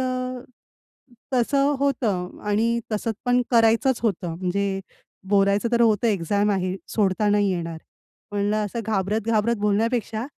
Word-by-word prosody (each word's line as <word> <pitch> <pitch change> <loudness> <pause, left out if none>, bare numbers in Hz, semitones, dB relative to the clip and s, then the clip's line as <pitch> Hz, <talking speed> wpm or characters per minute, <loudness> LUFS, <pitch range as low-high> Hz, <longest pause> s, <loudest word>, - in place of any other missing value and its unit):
अ, 255 -1 -3 0.9
तसं 275 +3 +2
होतं 215 -10 -1
आणि 230 +3 +1
तसंच 220 +1 -1
पण 245 0 +3
करायचंच 230 +1 +3
होतं. 180 -6 -1
म्हणजे 195 +1 -1 0.5
बोलायचं 200 +3 +2
तर 235 - +3
होतं, 225 -1 +3
एक्झाम 205 +1 +1
आहे, 185 -1 -1
सोडता 205 0 +1
नाही 205 -1 +2
येणार. 170 -3 -3 0.5
म्हणलं 205 +1 0
असं 230 +3 -4
घाबरत-घाबरत 215 +2 0
बोलण्यापेक्षा 220 +2 0
अ, 255 - -5
210 Hz, 125 wpm, -23 LUFS, 200-235 Hz, 0.9 s, पण